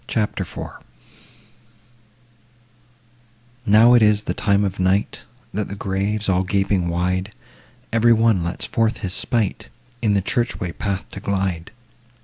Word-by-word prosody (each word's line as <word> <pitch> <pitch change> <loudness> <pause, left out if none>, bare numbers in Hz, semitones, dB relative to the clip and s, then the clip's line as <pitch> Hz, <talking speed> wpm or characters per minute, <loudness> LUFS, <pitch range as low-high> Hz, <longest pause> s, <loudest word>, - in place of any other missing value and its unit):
CHAPTER 105 -3 -1
IV - - -7 2.9
Now 110 +4 +7
it 120 - +6
is 105 -1 +4
the - - -2
time 100 -1 +2
of 95 0 -4
night, 95 +2 +1 0.3
That, 105 0 -2
the 100 - -6
graves 100 +2 -2
all 90 -1 +2
gaping 95 -1 0
wide, 90 +4 -1 0.6
Every 115 +1 +4
one 110 -5 +3
lets 85 +1 -3
forth 115 0 0
his 90 - -3
sprite, 110 -2 -1 0.3
In 105 -3 +2
the 100 - +2
church 120 +3 -1
way 90 - -3
path 100 +2 -3
to - - -8
glide. 95 -4 -2
100 Hz, 135 wpm, -21 LUFS, 95-110 Hz, 2.9 s, Now